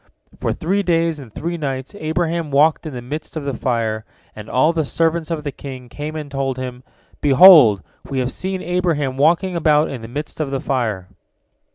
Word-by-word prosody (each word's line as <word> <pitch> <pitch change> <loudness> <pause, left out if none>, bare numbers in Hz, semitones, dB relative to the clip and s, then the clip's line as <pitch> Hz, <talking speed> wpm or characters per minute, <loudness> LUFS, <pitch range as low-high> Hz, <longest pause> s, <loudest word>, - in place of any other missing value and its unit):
For - - -1
three 195 +5 0
days 165 -4 +1
and 130 -6 -11
three 170 +10 -4
nights 135 -4 -4
Abraham 165 -2 -2
walked 150 +3 +3
in 150 - -7
the 120 - -6
midst 150 +5 -6
of 155 - -4
the 140 -1 -3
fire, 115 -3 -1 0.3
and 105 0 -9
all 155 +7 +3
the 160 -1 0
servants 165 +2 0
of 160 -3 -3
the 145 - -3
king 130 -3 -9
came 150 +5 -6
and 150 -2 -6
told 135 -2 -2
him, 125 -1 -6 0.4
"Behold, 140 - +8 0.3
we 135 - -3
have 130 0 0
seen 190 0 -4
Abraham 165 -6 0
walking 170 +6 +2
about 155 -2 +3
in 130 -4 -6
the 115 - -8
midst 145 +7 -6
of 155 -3 -1
the 135 -1 -2
fire." 110 -9 -2
145 Hz, 195 wpm, -20 LUFS, 130-165 Hz, 0.4 s, Behold